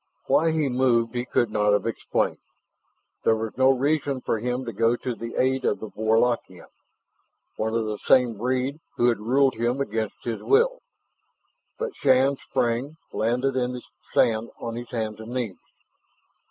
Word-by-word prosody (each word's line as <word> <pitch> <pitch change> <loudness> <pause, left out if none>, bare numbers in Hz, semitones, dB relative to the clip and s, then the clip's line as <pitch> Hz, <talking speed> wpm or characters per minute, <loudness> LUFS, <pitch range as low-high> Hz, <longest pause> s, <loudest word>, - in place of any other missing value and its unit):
Why 165 - +3
he 160 -2 +1
moved 125 -3 +2
he 120 0 -2
could 120 -2 +1
not 105 -1 +2
have 105 - +1
explained. 115 - -1 0.8
There 110 - +4
was 110 0 -4
no 130 +1 +4
reason 140 +1 +1
for 115 - -1
him 125 +3 -2
to 115 - -5
go 115 +1 +2
to 125 0 -4
the 115 0 -7
aid 130 +1 +1
of 100 - +1
the 110 - -7
Warlockian, 110 -3 0 0.9
one 110 +1 -2
of 115 -1 0
the 105 -1 -4
same 125 -3 +4
breed 130 +6 -1 0.2
who 120 - +4
had 115 - 0
ruled 130 +5 +3
him 120 +3 0
against 110 -5 -3
his 115 -2 -3
will. - - +3 1.0
But 475 -3 -3
Shann 135 0 +3
sprang, 125 +7 -1 0.2
landing 125 +5 0
in 125 -1 0
the 125 - -7 0.3
sand 115 0 +2
on 115 -1 -5
his 120 +1 -7
hands 110 -3 -3
and 110 +2 -8
knees. 115 -7 -3
120 Hz, 165 wpm, -25 LUFS, 115-130 Hz, 1.0 s, There